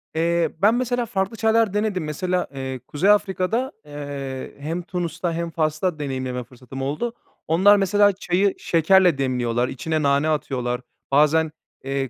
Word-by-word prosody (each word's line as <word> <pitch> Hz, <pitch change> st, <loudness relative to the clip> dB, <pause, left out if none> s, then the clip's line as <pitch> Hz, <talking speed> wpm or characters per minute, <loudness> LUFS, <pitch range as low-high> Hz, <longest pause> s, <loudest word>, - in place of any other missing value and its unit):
Eee, 170 Hz, +1 st, +1 dB
ben 215 Hz, +4 st, +5 dB
mesela, 245 Hz, -1 st, 0 dB
farklı 195 Hz, 0 st, -2 dB
çaylar 225 Hz, -2 st, +2 dB
denedim. 210 Hz, -4 st, 0 dB
Mesela, 180 Hz, +4 st, -1 dB
eee, 130 Hz, -1 st, -4 dB
Kuzey 165 Hz, +7 st, +1 dB
Afrika'da, 210 Hz, +5 st, +2 dB
eee, 140 Hz, -3 st, -6 dB
hem 160 Hz, +5 st, -3 dB
Tunus'ta 170 Hz, -1 st, -3 dB
hem 170 Hz, +1 st, -3 dB
Fas'ta 155 Hz, +1 st, -1 dB
deneyimleme 130 Hz, -3 st, -3 dB
fırsatım 125 Hz, +2 st, -10 dB
oldu. 150 Hz, -, -2 dB, 0.3 s
Onlar 190 Hz, +6 st, +5 dB
mesela 205 Hz, +1 st, +4 dB
çayı 190 Hz, +1 st, +1 dB
şekerle 175 Hz, 0 st, +4 dB
demliyorlar, 125 Hz, -2 st, 0 dB
içine 155 Hz, +5 st, -2 dB
nane 140 Hz, +2 st, +2 dB
atıyorlar. 125 Hz, -5 st, -1 dB, 0.3 s
Bazen, 150 Hz, +2 st, +4 dB, 0.3 s
eee, 135 Hz, -1 st, -2 dB
160 Hz, 140 wpm, -23 LUFS, 140-190 Hz, 0.3 s, ben